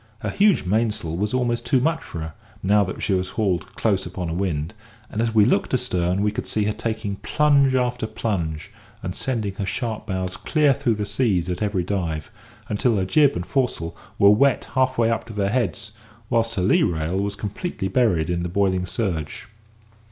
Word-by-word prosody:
Her - - -2
huge 200 - +3
mainsail 105 -5 0
was 105 +4 -1
almost 120 -2 0
too 130 - +2
much 160 +5 +1
for 85 - -7
her, 80 0 -6 0.3
now 100 +2 +4
that 95 - -6
she 100 - +1
was 90 -1 0
hauled 95 -7 -1
close 100 -4 +1
upon 90 -1 -5
a - - -2
wind; 85 -3 -2 0.4
and 110 - -1
as 115 -1 -1
we 105 -2 +6
looked 100 - +2
astern, 95 -6 0
we 105 - +2
could 105 - -5
see 105 - 0
her 105 +1 0
taking 110 -2 -3
plunge 140 -1 +3
after 125 -3 0
plunge, 85 -6 -3 0.3
and 90 -1 -3
sending 110 -3 -2
her 100 - -2
sharp 110 -3 -3
bows 95 -2 -3
clear 150 -3 +3
through 120 -2 0
the 105 0 -2
seas 100 -5 0
at 90 +1 -3
every 100 -4 0
dive, 85 -5 -3 0.4
until 115 +2 +1
her 95 -2 +1
jib 145 +7 +4
and 90 - -3
foresail 120 -12 -1 0.2
were 100 0 +7
wet 135 +5 +3
half 130 0 +2
way 115 -1 +3
up 115 0 -1
to 110 - -9
their 100 -1 0
heads, 110 -3 -1 0.4
whilst 115 0 +1
her 95 - 0
lee 95 - +4
rail 80 +2 0
was 100 +1 -2
completely 105 - -4
buried 95 -7 +2
in 85 0 -1
the 90 - -2
boiling 95 -1 +1
surge. 85 -8 -3
105 Hz, 200 wpm, -23 LUFS, 90-120 Hz, 0.4 s, were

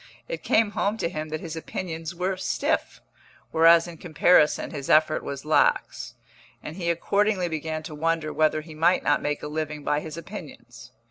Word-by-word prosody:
It - - -5
came 220 -2 +2
home 205 +1 -1
to 170 - -1
him 155 -3 -5
that 155 0 -4
his 165 -2 -6
opinions 165 0 -5
were 185 +2 -1
stiff, 185 - -2 0.5
whereas 165 +1 +6
in 170 -1 -9
comparison 155 -1 +3
his 140 -2 -6
effort 155 0 +4
was 140 0 -6
lax; 155 - +1 0.5
and 155 - -7
he 170 -2 -2
accordingly 200 +2 +1
began 160 -1 -4
to 155 - -8
wonder 160 0 -1
whether 155 0 +2
he 160 +1 -12
might 165 +4 +2
not - - +2
make 145 0 -2
a - - -3
living 150 -1 -4
by 150 - +1
his 155 +1 -8
opinions. 135 - -10
160 Hz, 180 wpm, -25 LUFS, 155-175 Hz, 0.5 s, whereas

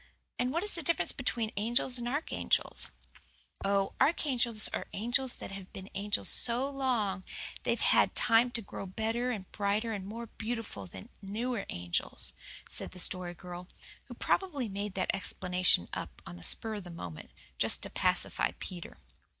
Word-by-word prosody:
And 250 +1 +2
what 335 +4 +1
is 415 - -2
the 340 - 0
difference 335 +2 +4
between 235 -4 -1
angels 240 +4 +1
and 240 - -2
archangels?" 290 +6 +2 0.7
"Oh, 195 0 +2
archangels 250 -8 +3
are - - -3
angels 240 +4 +1
that - - -7
have 195 -1 -8
been 190 +1 -8
angels 205 +1 0
so 245 +3 +2
long 245 -9 +1 0.3
that - - -14
they've - - +2
had - - +5
time 230 +1 +5
to 230 0 -2
grow 195 - -6
better 225 +5 0
and 205 -6 -4
brighter 210 +2 +1
and 195 -2 -4
more 230 +3 -5
beautiful 225 - -4
than 95 +1 -10
newer 220 +3 -2
angels," 85 0 -1 0.3
said - - +1
the 185 - -9
Story 175 0 -2
Girl, 180 +1 -8 0.4
who - - -9
probably 295 -11 +1
made 200 0 -3
that 185 - +2
explanation 180 - +2
up - - -5
on - - -7
the 85 - -11
spur 220 -1 +3
of 205 -2 -4
the 175 - -9
moment, 90 - -7 0.3
just - - +6
to - - -4
pacify - - +1
Peter. 175 -2 -6
215 Hz, 165 wpm, -32 LUFS, 190-245 Hz, 0.7 s, just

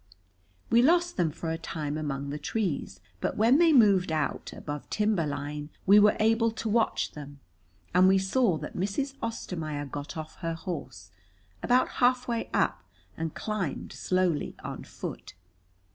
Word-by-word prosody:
We 235 +1 +6
lost 345 +5 +3
them 175 -4 +2
for 160 +2 -4
a 165 - -3
time 150 -3 -4
among 140 -2 -3
the 150 - -4
trees, 155 - -2 0.2
but - - -2
when 235 +7 +5
they 340 -1 +6
moved 200 - +5
out 155 -2 -2
above 145 -1 -7
timber 210 -7 +1
line 145 +1 -4 0.2
we 200 +2 +8
were 210 0 +5
able 225 +1 +3
to 225 0 -5
watch 225 +1 +1
them, 145 -1 -10 0.5
and 180 +1 +6
we 190 0 +5
saw 190 -1 +2
that 150 0 -7
Mrs. 205 +9 -2
Ostermaier 160 -10 -4
got 145 +3 -6
off 155 0 -7
her 165 -2 -3
horse, 140 - -7 0.5
about 250 +1 +3
halfway 245 -2 +2
up, 95 0 +1 0.3
and 160 -1 -4
climbed 205 -9 -3
slowly 185 -4 0
on - - -6
foot. - - -8
180 Hz, 155 wpm, -28 LUFS, 150-225 Hz, 0.5 s, we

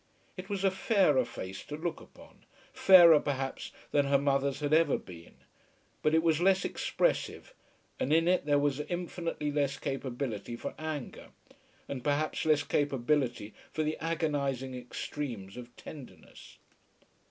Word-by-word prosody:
It 185 -1 -8
was 200 -1 -2
a 195 - +4
fairer 190 - +3
face 95 -3 -7
to 150 - -6
look 165 +1 -4
upon, - - -17 0.3
fairer, 170 -5 +8
perhaps, 135 -2 -3 0.2
than 145 -1 +2
her 140 0 +4
mother's 140 0 0
had 150 0 -1
ever 160 -2 +4
been; 85 -2 -13 0.7
but 155 +1 +2
it 160 - +3
was 165 -1 +2
less 190 +1 +3
expressive, - - -1 0.5
and 135 - -1
in 165 +2 +4
it 180 -4 +2
there 145 -1 +4
was 145 -1 +1
infinitely 170 -1 -3
less 145 -2 0
capability 125 -5 -4
for - - -6
anger, 155 -4 -5 0.6
and 130 -3 -5
perhaps 150 +2 0
less 150 -2 +3
capability 135 -6 0 0.2
for 155 - -1
the 155 +1 -1
agonising 145 -5 -1
extremes 120 -4 -6
of 120 0 -10
tenderness. 140 -5 -12
145 Hz, 140 wpm, -30 LUFS, 135-160 Hz, 0.7 s, fairer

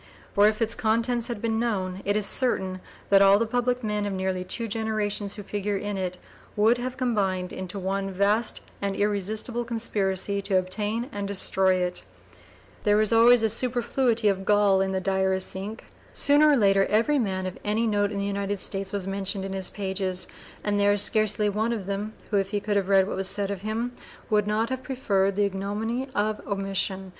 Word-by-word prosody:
For 205 0 +5
if 215 +2 +1
its 225 +1 +1
contents 230 +2 0
had 235 -4 -5
been 225 -1 0
known, 190 -5 -2
it 205 +1 +1
is 210 -1 +1
certain 190 -6 +1 0.3
that 195 0 +7
all 195 0 +7
the 230 - +1
public 245 +2 -1
men 210 -1 -1
of 200 - -3
nearly 190 -1 -2
two 225 +5 -3
generations 210 -2 -2
who 205 - -8
figure 205 0 -2
in 205 +1 -3
it 185 -1 -3 0.4
would 225 +4 +3
have 255 +1 -4
combined 195 -7 -1
into 185 +1 -6
one 195 +1 -2
vast 200 +4 +1 0.2
and 200 -1 -1
irresistible 210 +4 -1
conspiracy 200 -4 -1
to 195 -1 +1
obtain 210 +5 -1
and 200 -1 -4
destroy 190 -1 +2
it. 180 -1 -2 0.8
There 210 -1 +3
was 215 +1 +2
always 230 +1 +6
a - - +4
superfluity 240 -1 +1
of 195 -1 +1
gall 205 -1 +3
in 190 0 0
the 190 - 0
diarist's 190 0 0
ink. 205 +4 -7 0.2
Sooner 295 +2 +5
or 290 - +5
later 195 -3 +4
every 230 +7 +2
man 190 -5 -1
of 185 - -6
any 215 +3 +1
note 205 -2 +1
in 205 - -4
the 200 - -1
United 200 0 -2
States 195 0 -2
was 200 -2 -3
mentioned 195 0 -3
in 195 - -5
his 190 -1 -1
pages, 190 -2 -3 0.4
and 205 -1 0
there 205 0 +4
is 205 - +4
scarcely 215 -1 +2
one 215 +3 0
of 215 -5 -3
them, 200 +2 -3 0.2
who, 205 - +2
if 195 -1 0
he 205 0 -1
could 205 0 -2
have 195 -1 0
read 195 -1 +5
what - - -4
was 190 0 -1
said 200 0 0
of 195 -2 -5
him, 220 +4 -2 0.4
would 210 -1 +2
not 220 +3 0
have 260 0 -2
preferred 200 -7 0
the 205 0 +2
ignominy 210 +6 -3
of 210 +1 0
omission. 195 -1 -2
205 Hz, 200 wpm, -26 LUFS, 195-220 Hz, 0.8 s, that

